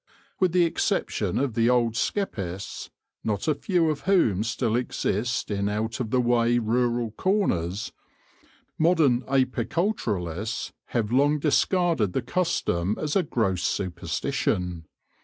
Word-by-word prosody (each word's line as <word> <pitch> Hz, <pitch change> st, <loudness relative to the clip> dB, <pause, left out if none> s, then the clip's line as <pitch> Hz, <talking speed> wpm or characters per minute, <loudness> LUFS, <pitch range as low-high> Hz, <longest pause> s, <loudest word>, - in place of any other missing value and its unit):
With 185 Hz, -2 st, +3 dB
the 180 Hz, 0 st, +4 dB
exception 165 Hz, -, -1 dB
of 140 Hz, -4 st, 0 dB
the 115 Hz, +1 st, +2 dB
old 120 Hz, -2 st, +2 dB
skeppists, 100 Hz, -, -3 dB, 0.3 s
not 105 Hz, +5 st, -2 dB
a 155 Hz, -, +4 dB
few 165 Hz, +2 st, +1 dB
of 150 Hz, -, -3 dB
whom 110 Hz, -, +3 dB
still 115 Hz, -1 st, -1 dB
exist 120 Hz, -2 st, -1 dB
in 100 Hz, 0 st, 0 dB
out 110 Hz, +3 st, -2 dB
of 120 Hz, -4 st, -2 dB
the 130 Hz, -, +2 dB
way 120 Hz, -1 st, +3 dB
rural 120 Hz, 0 st, 0 dB
corners, 105 Hz, -, 0 dB, 0.9 s
modern 155 Hz, -7 st, +4 dB
apiculturists 120 Hz, -, -1 dB
have 115 Hz, -3 st, -2 dB
long 145 Hz, +4 st, +3 dB
discarded 155 Hz, -, +2 dB
the 130 Hz, -, -1 dB
custom 110 Hz, -, 0 dB
as 150 Hz, -1 st, -2 dB
a 195 Hz, -, +5 dB
gross 110 Hz, -, 0 dB
superstition. 85 Hz, -1 st, -2 dB
120 Hz, 125 wpm, -26 LUFS, 105-150 Hz, 0.9 s, a